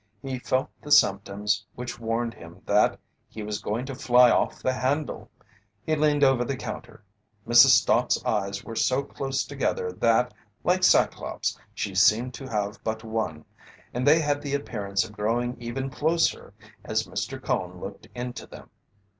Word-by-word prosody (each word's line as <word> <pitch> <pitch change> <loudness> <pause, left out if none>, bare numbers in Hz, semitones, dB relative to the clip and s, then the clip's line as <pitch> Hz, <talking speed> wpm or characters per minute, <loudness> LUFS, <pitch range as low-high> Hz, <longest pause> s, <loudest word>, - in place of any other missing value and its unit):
He 130 -2 -4
felt 130 +1 -1
the 150 - -9
symptoms 100 -3 +3
which 120 0 -6
warned 115 +1 -2
him 85 +2 -14
that 105 +1 +3 0.3
he 110 - -7
was 105 0 -4
going 115 +5 -2
to 135 - -6
"fly 125 -2 +5
off - - +1
the 130 - +1
handle." 135 +4 -2 0.6
He 155 - +1
leaned 150 -1 +2
over 135 -3 +4
the 135 +2 -3
counter. 105 - -8 0.4
Mrs. 120 0 +8
Stott's - - +1
eyes 100 +1 -1
were 115 - -8
so 130 +4 +1
close 135 -1 -3
together 135 -9 -2
that, 115 +6 +2 0.3
like 185 +1 +2
Cyclops, - - +2 0.2
she 100 - -3
seemed 115 +6 +3
to 135 +2 -8
have 105 -2 -3
but 110 0 -3
one, 110 -9 -3 0.5
and 125 +3 -1
they 150 +3 +7
had 145 -2 0
the 140 -1 -2
appearance 100 -8 -2
of 110 - -9
growing 115 +4 -1
even 130 +3 -4
closer 160 +5 0 0.3
as - - 0
Mr. - - -4
Cone - - -2
looked - - -8
into 125 0 -6
them. - - -13
120 Hz, 165 wpm, -26 LUFS, 105-135 Hz, 0.6 s, Mrs